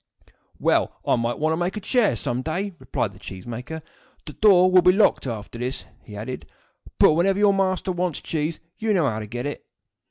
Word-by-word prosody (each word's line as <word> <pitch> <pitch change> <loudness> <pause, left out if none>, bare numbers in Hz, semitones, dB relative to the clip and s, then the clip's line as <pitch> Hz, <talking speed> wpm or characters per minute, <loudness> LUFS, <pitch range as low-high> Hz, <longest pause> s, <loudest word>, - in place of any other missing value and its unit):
"Well, - - +1
I - - +3
may 115 0 -1
want 155 +1 0
to - - -1
make 175 +4 -2
a - - -1
chair 215 - +2
some 120 +3 -2
day," 185 +8 -3
replied - - -2
the - - -16
cheese 95 -1 -9
maker. 125 +7 -6 0.4
"The 150 - -8
door 185 -2 +5
will 185 0 +7
be 180 +1 +6
locked 195 -7 +3
after 115 0 -6
this," 125 +2 -4 0.2
he 105 - -11
added; 120 +5 -6 0.5
"but - - +6
whenever 190 +4 +2
your 205 -1 +4
master 190 -1 0
wants 175 -3 -2
cheese, 155 0 -3 0.2
you 220 -2 +1
know 165 -6 +3
how 110 -3 -2
to 105 - -6
get 120 +4 -5
it." 145 - -5
160 Hz, 210 wpm, -23 LUFS, 120-185 Hz, 0.5 s, will